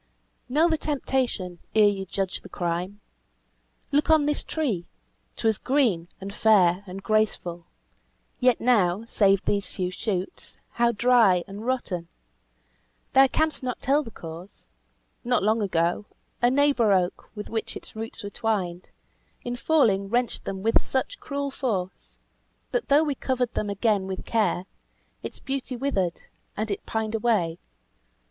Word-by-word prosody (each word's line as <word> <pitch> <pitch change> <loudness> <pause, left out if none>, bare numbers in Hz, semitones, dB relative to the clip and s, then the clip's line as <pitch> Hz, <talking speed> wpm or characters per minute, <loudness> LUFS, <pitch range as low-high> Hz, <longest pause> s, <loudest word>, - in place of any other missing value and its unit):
"Know 305 +6 +4
the 320 -2 +1
temptation 255 - -1 0.2
ere 215 -1 +7
you 195 -2 -1
judge 190 0 -2
the - - -12
crime! 180 +3 -3 0.9
Look 295 +2 +2
on 315 -2 +5
this 295 0 +2
tree 230 - -2 0.5
'twas 220 -3 +1
green, 240 -12 +1
and 195 +1 -7
fair, 195 -4 +4
and 190 +1 -7
graceful; 190 -6 0 0.7
Yet 250 -1 +4
now, 215 -4 +2
save 200 -3 +3
these 200 -2 +1
few 180 -1 -3
shoots, 185 -1 -4
how 235 0 +2
dry 225 -6 +4
and 205 +4 -7
rotten! 190 -10 -2 1.1
Thou 270 0 +7
canst 315 +3 0
not 250 -1 -3
tell 280 +3 +2
the 270 - -8
cause. 170 -1 -10 0.6
Not 245 -4 +1
long 220 +2 +2
ago, 175 +1 0 0.3
A 240 - +5
neighbour 270 -5 +3
oak, 180 -2 0
with 210 -1 -7
which 225 -1 -3
its - - -13
roots 225 0 -6
were 205 - -5
twined, 190 -7 -2 0.5
In 245 0 -3
falling 235 -8 +2
wrenched 240 +1 0
them 190 0 -4
with 225 - +4
such 270 - -2
cruel 280 -1 -3
force, 200 -10 -3 0.5
That - - -1
though 290 +3 +6
we 295 -2 0
covered 255 -3 -1
them 210 - -2
again 200 -1 +1
with 190 -1 -5
care, 215 -5 +1 0.6
Its - - -6
beauty 270 -2 -4
withered, 205 -10 -1 0.4
and 215 0 -2
it 200 - -4
pined 220 0 -2
away. 210 -7 +1
220 Hz, 145 wpm, -26 LUFS, 190-255 Hz, 1.1 s, ere